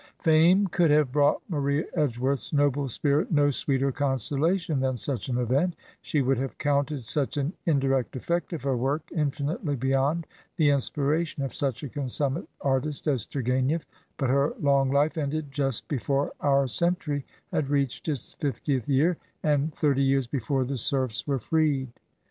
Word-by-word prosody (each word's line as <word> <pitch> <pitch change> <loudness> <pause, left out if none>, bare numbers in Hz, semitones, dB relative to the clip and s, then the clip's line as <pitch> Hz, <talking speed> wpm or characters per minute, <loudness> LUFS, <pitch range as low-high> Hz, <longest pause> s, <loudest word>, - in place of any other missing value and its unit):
Fame 165 +5 +4
cduld 170 -2 +2
have 150 -3 +3
brought 145 +1 +2
Maria 145 -2 0
Edgeworth's 135 -3 -1
noble 145 -2 +1
spirit 145 - +1
no 145 -2 +4
sweeter 135 0 0
consolation 145 - 0
than 130 -1 0
such 130 -1 -3
an 125 - 0
event; 135 +9 +1 0.3
she 145 -3 0
would 130 -1 +1
have 135 0 -4
counted 145 -2 0
such 140 +4 -1
an 145 +4 -1
indirect 135 -5 +1
effect 170 +9 -2
of 165 -7 -5
her 135 -2 +1
work 135 +6 -1
infinitely 150 0 -1
bejrond 135 +5 +1 0.3
the 150 -4 +4
inspiration 145 +2 0
of 135 - -3
such 135 -1 -2
a - - -3
constmunate 140 +2 -2
artist 140 +2 -1
as 135 -8 0
Tourgu6nief, 130 +4 0 0.3
but 130 -3 0
her 140 +2 +2
long 140 -2 +3
Ufe 145 +4 +2
ended 145 0 -2
just 135 -3 -1
be 145 - -1
fore 140 +3 0
our 140 -1 +3
century 150 -1 0 0.3
had 140 -3 -1
reached 140 -1 -1
its 145 -5 -4
fiftieth 135 -3 -1
year, 155 +6 +3 0.3
and 150 0 +2
thirty 145 -2 +1
years 135 -1 +2
before 130 +1 -1
the 135 0 -3
serfs 130 -1 -1
were 140 -2 +1
freed. 140 0 +1
140 Hz, 160 wpm, -27 LUFS, 135-150 Hz, 0.3 s, Fame